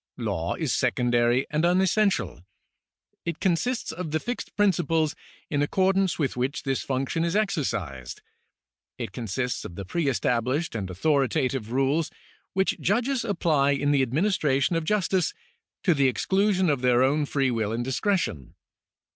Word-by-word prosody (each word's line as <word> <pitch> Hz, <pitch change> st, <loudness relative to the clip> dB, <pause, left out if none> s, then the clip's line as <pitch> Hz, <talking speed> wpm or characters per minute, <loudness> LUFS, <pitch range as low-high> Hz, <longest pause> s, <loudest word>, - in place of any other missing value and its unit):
Law -, -, -2 dB
is -, -, -1 dB
secondary 120 Hz, +1 st, +2 dB
and 150 Hz, +1 st, 0 dB
unessential. 180 Hz, -, +2 dB, 0.8 s
It 170 Hz, -2 st, -4 dB
consists 210 Hz, +7 st, 0 dB
of 165 Hz, 0 st, -5 dB
the 155 Hz, +1 st, 0 dB
fixed 245 Hz, +6 st, -5 dB
principles 165 Hz, -6 st, +2 dB, 0.3 s
in 145 Hz, -2 st, -1 dB
accordance 190 Hz, +3 st, +2 dB
with 140 Hz, -5 st, -1 dB
which 130 Hz, +5 st, -2 dB
this 135 Hz, -2 st, -1 dB
function 135 Hz, +5 st, -1 dB
is 170 Hz, +2 st, -1 dB
exercised. 115 Hz, -, -2 dB, 0.7 s
It -, -, -5 dB
consists 125 Hz, +3 st, -3 dB
of 85 Hz, -, -8 dB
the 100 Hz, -, -6 dB
pre 165 Hz, -, -1 dB
established 130 Hz, +4 st, 0 dB
and 100 Hz, -5 st, -4 dB
authoritative 135 Hz, -, 0 dB
rules 135 Hz, +5 st, +1 dB, 0.4 s
which 190 Hz, 0 st, +1 dB
judges 245 Hz, +6 st, +1 dB
apply 160 Hz, -9 st, +2 dB
in 145 Hz, +1 st, +1 dB
the 140 Hz, -2 st, +3 dB
administration 145 Hz, -, +1 dB
of 165 Hz, -1 st, -1 dB
justice, 195 Hz, -, +1 dB, 0.5 s
to 180 Hz, -, +4 dB
the 140 Hz, -3 st, +3 dB
exclusion 190 Hz, -, +1 dB
of 140 Hz, -3 st, -1 dB
their 125 Hz, 0 st, +4 dB
own 145 Hz, +2 st, +2 dB
free 135 Hz, -3 st, +1 dB
will 110 Hz, -3 st, -1 dB
and 115 Hz, +2 st, -2 dB
discretion. 130 Hz, -, -1 dB
145 Hz, 145 wpm, -26 LUFS, 125-180 Hz, 0.8 s, to